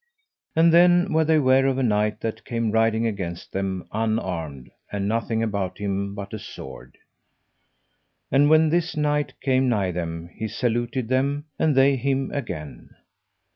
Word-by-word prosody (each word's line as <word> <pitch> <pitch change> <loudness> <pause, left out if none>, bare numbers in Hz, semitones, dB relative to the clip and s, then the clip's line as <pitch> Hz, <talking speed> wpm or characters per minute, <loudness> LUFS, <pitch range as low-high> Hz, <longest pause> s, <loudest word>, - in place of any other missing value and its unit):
And 165 +1 +5
then 175 +2 +5
were 160 0 +4
they 160 0 +3
ware 135 -1 +4
of 135 -1 0
a 135 - 0
knight 105 -2 +1
that 115 -1 -4
came 115 -2 -2
riding 115 +1 +2
against 95 -6 -4
them 95 -1 -3
unarmed, 90 - -3 0.2
and 100 -1 -2
nothing 115 +1 -1
about 100 -5 -2
him 100 0 -3
but 100 0 -7
a 110 - -4
sword. - - -10 1.3
And 145 +2 +4
when 155 0 +5
this 165 0 0
knight 150 -1 -1
came 130 -1 +2
nigh 100 -6 +1
them 85 0 -5
he 110 - -4
saluted 120 +2 -1
them, 140 +4 0
and 155 -3 +2
they 135 +1 +4
him 135 +1 -1
again. 90 - -6
115 Hz, 155 wpm, -24 LUFS, 100-140 Hz, 1.3 s, And